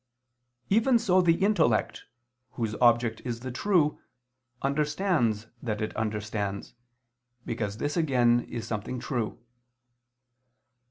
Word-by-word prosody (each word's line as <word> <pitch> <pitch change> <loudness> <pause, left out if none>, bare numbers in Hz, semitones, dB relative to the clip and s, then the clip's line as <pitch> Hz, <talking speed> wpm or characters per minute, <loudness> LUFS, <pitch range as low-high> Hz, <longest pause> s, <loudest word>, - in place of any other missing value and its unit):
Even 230 +4 +4
so 185 -5 +3
the 170 -2 +4
intellect, 195 - +2 0.5
whose 115 -3 -2
object 120 -2 +3
is 120 -2 -4
the 130 0 -5
true, 165 +1 +1 0.6
understands 145 - +1 0.2
that 110 -4 -3
it 110 - -3
understands, 105 -2 -3 0.7
because 105 -3 -3
this 145 +4 -2
again 125 -7 +3
is 115 -2 -5
something 110 +3 -4
true. 120 -4 -3
120 Hz, 105 wpm, -28 LUFS, 110-155 Hz, 0.7 s, Even